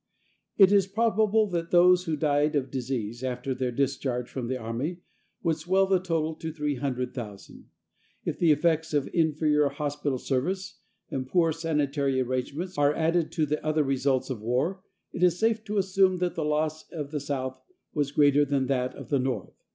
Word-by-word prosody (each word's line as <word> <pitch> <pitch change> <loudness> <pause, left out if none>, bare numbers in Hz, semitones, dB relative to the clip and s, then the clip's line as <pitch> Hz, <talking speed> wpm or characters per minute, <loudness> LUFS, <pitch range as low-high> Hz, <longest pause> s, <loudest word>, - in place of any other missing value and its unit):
It 195 -1 +7
is 200 -2 +4
probable 220 +1 +2
that 170 -1 -2
those 180 +1 +5
who 160 -3 -1
died 150 0 +1
of 135 -2 -1
disease 120 -3 -3
after 130 +1 -2
their 125 -1 -2
discharge 130 -1 -1
from 125 -2 -5
the 130 +1 -2
army 125 +10 -4 0.4
would 165 -2 +1
swell 190 +4 +2
the 190 -1 +2
total 165 -3 -1
to 160 0 -5
300,000. 125 -8 -4 0.6
If - - -3
the 165 -2 +5
effects 160 +1 +1
of 145 -2 +1
inferior 150 -3 +2
hospital 145 -1 -2
service 180 +11 -2 0.3
and 130 -1 -3
poor 165 +2 +3
sanitary 145 -4 0
arrangements 140 +7 -3
are 145 +1 +3
added 165 0 +1
to 160 -3 +1
the 150 +1 -2
other 155 0 +1
results 135 -1 0
of 115 -5 -5
war, 130 - -1 0.3
it - - -5
is 180 -1 +4
safe 220 +1 +1
to 210 0 -3
assume 190 -1 +3
that 180 0 -1
the 160 - -2
loss 155 +1 -1
of 150 -4 -6
the 150 - -2
South 130 -2 -4 0.3
was 145 -3 0
greater 145 0 +4
than 140 -2 0
that 130 -1 -1
of - - -10
the 140 - +2
North. 130 0 -2
150 Hz, 175 wpm, -27 LUFS, 130-170 Hz, 0.6 s, It